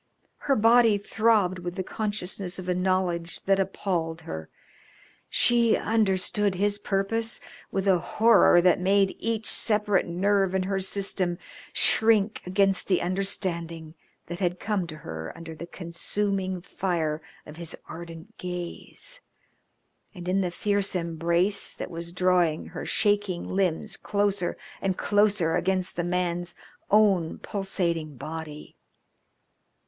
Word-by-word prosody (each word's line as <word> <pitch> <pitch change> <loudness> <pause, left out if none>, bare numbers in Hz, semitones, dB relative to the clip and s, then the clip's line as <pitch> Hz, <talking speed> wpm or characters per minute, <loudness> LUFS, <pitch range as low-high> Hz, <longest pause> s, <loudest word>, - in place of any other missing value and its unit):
Her 275 - +5
body 230 -1 +5
throbbed 205 -3 +2
with 175 0 -5
the 190 - -2
consciousness 195 -3 -3
of 185 -1 -7
a 180 - +2
knowledge 180 -2 -1
that 195 0 +2
appalled 175 -4 -2
her. 80 - -7 0.8
She 235 -2 +4
understood 205 -2 +1
his 205 +2 0
purpose 215 +4 -1 0.3
with 195 0 -2
a 185 -2 +5
horror 210 -1 +5
that 180 -2 +4
made 195 +1 +2
each 225 -1 -2
separate 210 -4 +1
nerve 190 +2 +1
in 190 - +1
her 195 +1 -1
system 190 -2 0 0.3
shrink 220 -1 +4
against 195 0 +2
the 185 -3 +3
understanding 170 -4 -2 0.3
that 175 +1 -6
had 180 -1 -1
come 200 -4 -1
to 155 -1 -8
her 80 - -7
under 165 -1 -8
the 165 +2 -8
consuming 185 +2 -2
fire 165 -5 -2 0.2
of 150 - -11
his 170 -2 -6
ardent 165 +5 -10
gaze, 180 - -6 0.9
and 175 -1 -8
in 190 +2 +2
the 180 - 0
fierce 200 +2 0
embrace 170 +3 +1
that - - -6
was 170 0 -5
drawing 180 -3 +2
her - - -6
shaking 205 -4 +1
limbs 185 -4 -1
closer 200 -3 0 0.2
and 190 -1 -1
closer 205 -5 +2
against 185 -1 0
the 175 - -1
man's 175 0 -1 0.3
own 195 -6 +3
pulsating 170 -6 -2
body. 155 +2 -7
185 Hz, 130 wpm, -26 LUFS, 170-205 Hz, 0.9 s, Her